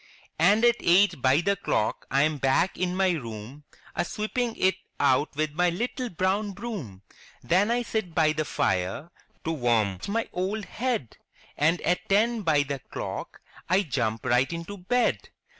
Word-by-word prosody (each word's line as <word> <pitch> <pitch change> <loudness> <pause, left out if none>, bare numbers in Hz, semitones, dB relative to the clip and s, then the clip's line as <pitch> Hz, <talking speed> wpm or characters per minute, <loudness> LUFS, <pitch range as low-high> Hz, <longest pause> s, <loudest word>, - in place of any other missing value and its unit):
And 205 +8 +5
at 240 0 +4
eight 180 -4 +4
by 130 +5 +4
the 200 +3 +1
clock 180 - -1
I 140 - +3
am 155 -1 0
back 135 +8 +2
in 180 0 -1
my 190 -1 +3
room, 125 -1 -6 0.3
A 175 - +1
sweeping 225 +5 -2
it 190 0 +3 0.3
out 140 +2 +2
with 155 +1 0
my 180 +3 +2
little 240 +7 -3
brown 195 +3 0
broom! 165 - -7 0.4
Then 190 +5 +3
I 240 +1 +1
sit 220 -7 -3
by 155 -3 +4
the 155 0 -1
fire 140 - -1 0.3
to 165 - -1
warm 115 - +1
my 225 +3 -1
old 195 +4 -2
head. 235 - -3 0.4
And 165 +4 +2
at 180 - -1
ten 220 +3 +3
by 155 -6 +3
the 140 -1 -4
clock - - -6 0.3
I 190 +3 +4
jump 115 - -2
right 125 +3 +2
into 170 +4 -5
bed!'' 245 +7 0
175 Hz, 165 wpm, -26 LUFS, 140-205 Hz, 0.4 s, And